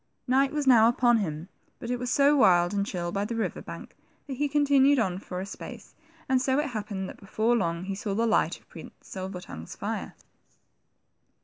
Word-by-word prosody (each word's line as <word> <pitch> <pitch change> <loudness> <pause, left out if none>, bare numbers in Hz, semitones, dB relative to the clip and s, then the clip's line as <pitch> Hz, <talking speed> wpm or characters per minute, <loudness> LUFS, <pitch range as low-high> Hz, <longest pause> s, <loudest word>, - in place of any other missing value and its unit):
Night 270 +2 +3
was 300 -1 -2
now 235 -4 +7
upon 240 0 +3
him, 165 -5 -3 0.3
but 235 - -6
it 245 - -1
was 250 0 -3
so 285 +2 +4
wild 175 -9 +4
and 200 0 0
chill 175 -3 -3
by 200 +2 -1
the 230 +3 -3
river 225 - -2
bank, - - -10 0.3
that 280 - -6
he 290 +1 0
continued 285 -1 +4
on 190 -6 0
for 180 -2 -6
a 190 - -4
space, 200 - -10 0.3
and 260 -1 +2
so 265 +1 +1
it 295 -1 0
happened 205 -4 -4
that - - -10
before 220 +4 0
long 170 -5 -1
he 195 +1 -4
saw 195 0 -3
the 230 +2 +1
light 225 - +1
of - - -30
Prince - - -11
Silver 190 -1 -7
tongue's 80 - -9
fire. - - -4
220 Hz, 205 wpm, -27 LUFS, 190-260 Hz, 0.3 s, now